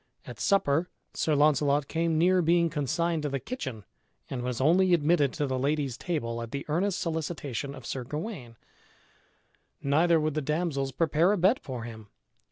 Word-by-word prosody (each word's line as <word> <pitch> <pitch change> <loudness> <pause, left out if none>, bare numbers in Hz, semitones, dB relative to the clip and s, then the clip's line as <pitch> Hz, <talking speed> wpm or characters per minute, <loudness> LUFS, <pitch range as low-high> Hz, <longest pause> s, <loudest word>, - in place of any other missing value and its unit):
At - - -9
supper 175 -4 +2 0.2
Sir 155 - +1
Launcelot 145 -1 +3
came 165 -1 0
near 180 +3 +4
being 170 0 +3
consigned 165 +3 0
to 150 - -2
the 135 0 -2
kitchen 130 - -6 0.5
and 125 - -3
was 125 -1 -3
only 175 +6 +4
admitted 150 -3 +2
to 150 - -1
the 130 -1 -2
lady's 140 -2 0
table 115 -9 -3
at 115 - -6
the 140 +3 -5
earnest 175 +5 0
solicitation 150 -5 -3
of 130 -3 -11
Sir 130 +1 -4
Gawain. 150 - -6 1.3
Neither 160 +4 +3
would 155 -1 0
the 155 - -1
damsels 150 -2 -1
prepare 165 +4 +2
a - - 0
bed 190 +8 +3
for 125 -3 -6
him. 110 -2 -9
150 Hz, 170 wpm, -28 LUFS, 135-170 Hz, 1.3 s, near